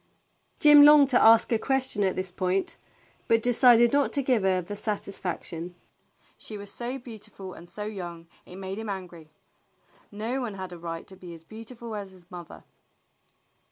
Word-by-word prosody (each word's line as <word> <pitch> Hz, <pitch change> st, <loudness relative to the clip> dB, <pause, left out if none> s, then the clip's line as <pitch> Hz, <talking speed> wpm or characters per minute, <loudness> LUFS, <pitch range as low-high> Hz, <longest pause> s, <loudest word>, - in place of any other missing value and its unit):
Jim 295 Hz, -1 st, +8 dB
longed 290 Hz, -1 st, +7 dB
to 245 Hz, -, +4 dB
ask 225 Hz, +1 st, +5 dB
a 225 Hz, -, +2 dB
question 265 Hz, -5 st, -1 dB
at 190 Hz, -, 0 dB
this 185 Hz, -1 st, -3 dB
point, 185 Hz, +1 st, 0 dB, 0.5 s
but 230 Hz, -, +3 dB
de 245 Hz, -, +3 dB
cided 240 Hz, -1 st, +6 dB
not 285 Hz, -1 st, +2 dB
to 280 Hz, -, +2 dB
give 250 Hz, -4 st, +1 dB
her 190 Hz, -1 st, +1 dB
this 200 Hz, +4 st, -6 dB
satisfaction. 180 Hz, -4 st, -5 dB, 0.6 s
She 215 Hz, -, -8 dB
was 200 Hz, 0 st, -9 dB
so 245 Hz, +4 st, -5 dB
beautiful 215 Hz, -6 st, -11 dB
and 170 Hz, +1 st, -14 dB
so 210 Hz, -, -7 dB
young 175 Hz, -5 st, -7 dB, 0.2 s
it 180 Hz, -, -13 dB
made 190 Hz, +1 st, -6 dB
him 220 Hz, -1 st, -6 dB
angry. 175 Hz, -5 st, -8 dB, 0.8 s
No 225 Hz, +6 st, -4 dB
one 225 Hz, -5 st, -5 dB
had 185 Hz, -2 st, -7 dB
a 175 Hz, -, -10 dB
right 165 Hz, -1 st, -7 dB
to 190 Hz, -, -15 dB
be 180 Hz, -2 st, -11 dB
as 165 Hz, -, -16 dB
beautiful 225 Hz, +4 st, -10 dB
as 200 Hz, -2 st, -7 dB
his 180 Hz, -1 st, -21 dB
mother. 175 Hz, -2 st, -11 dB
205 Hz, 180 wpm, -26 LUFS, 180-235 Hz, 0.8 s, Jim